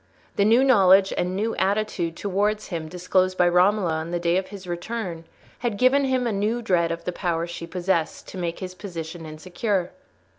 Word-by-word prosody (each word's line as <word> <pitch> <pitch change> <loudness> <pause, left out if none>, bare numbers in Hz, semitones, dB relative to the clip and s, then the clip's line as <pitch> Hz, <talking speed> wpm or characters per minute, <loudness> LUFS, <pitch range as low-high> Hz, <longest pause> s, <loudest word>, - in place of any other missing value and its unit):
The 200 - +3
new 230 +5 +5
knowledge 195 -6 +5
and 180 +1 -1
new 220 +3 -1
attitude 190 -4 0
towards 205 +2 -1
him 165 -4 -4
disclosed 185 +1 0
by 180 - +4
Romola 180 +1 +3
on 160 +1 -3
the 175 0 -2
day 170 0 +1
of 190 0 -2
his 195 -1 -10
return, 175 -1 -5 0.3
had 235 -4 -2
given 265 +4 +4
him 260 -2 +1
a 235 - 0
new 215 +4 -1
dread 170 -5 +2
of 170 0 -4
the - - -1
power 170 -2 -1
she 170 -1 -7
possessed 175 -2 -1
to 190 - -7
make 170 -1 -3
his 185 -1 -5
position 165 -3 -7
insecure. 180 +4 -2
185 Hz, 190 wpm, -24 LUFS, 170-210 Hz, 0.3 s, new